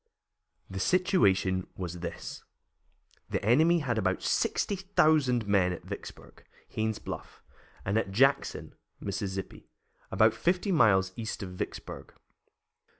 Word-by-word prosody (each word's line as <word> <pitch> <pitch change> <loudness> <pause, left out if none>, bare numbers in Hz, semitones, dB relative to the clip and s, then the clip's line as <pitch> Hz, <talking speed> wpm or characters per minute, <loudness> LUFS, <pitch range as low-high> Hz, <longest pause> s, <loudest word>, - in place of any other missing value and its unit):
The - - -6
situation 100 - +2
was 90 -2 -5
this: 85 0 -7 0.9
The - - -2
enemy 160 +9 +4
had 120 -6 -1
about 95 -2 0
sixty 200 - 0
thousand 155 - +2
men 100 -3 +3
at 90 - -6
Vicksburg, - - -9 0.3
Haines' 110 0 -1
Bluff, - - -8 0.4
and 100 +3 +2
at 110 - -3
Jackson, 135 +8 +1 0.3
Mississippi, 95 -1 -5 0.4
about 110 +3 +4
fifty 180 +3 0
miles 95 - +4
east 115 -2 -4
of 95 - -6
Vicksburg. 90 - -7
110 Hz, 115 wpm, -29 LUFS, 95-150 Hz, 0.9 s, enemy